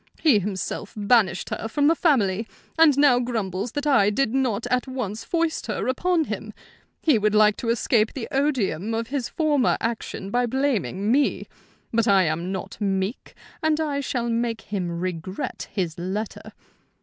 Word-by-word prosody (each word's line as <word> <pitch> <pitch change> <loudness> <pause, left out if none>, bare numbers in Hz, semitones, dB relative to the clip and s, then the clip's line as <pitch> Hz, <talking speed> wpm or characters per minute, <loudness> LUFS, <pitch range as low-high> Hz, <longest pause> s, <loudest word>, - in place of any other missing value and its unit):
He 280 -10 +4
himself 200 +1 -4
banished 205 -3 +2
her 225 - -3
from 285 +6 0
the 315 - +6
family, 225 - +1 0.3
and 320 -4 +5
now 280 -4 +5
grumbles 220 -3 -3
that 290 0 -3
I 235 -9 +4
did 230 +2 0
not 245 -5 0
at 250 +1 +1
once 230 -5 -4
foist 335 -2 -1
her - - -2
upon 340 +6 +1
him. - - -5 0.5
He 295 -9 +3
would 210 0 +1
like 210 -1 +5
to 230 - -3
escape 230 -1 +2
the 250 -5 -5
odium 225 - 0
of 230 0 -3
his 265 -3 -2
former 295 -5 +2
action 225 -3 -4
by 245 +1 +1
blaming 230 -6 0
me; 280 +3 +2 0.5
but 230 -1 +2
I 195 -2 +5
am 170 +3 -1
not 195 +2 -6
meek, 195 +2 -2 0.3
and 315 -1 +1
I 295 -3 -1
shall 250 -3 -2
make 230 -1 -1
him 190 -4 -3
regret 175 +1 -4
his 175 -5 -3
letter. 195 +5 -4
230 Hz, 165 wpm, -24 LUFS, 195-270 Hz, 0.5 s, the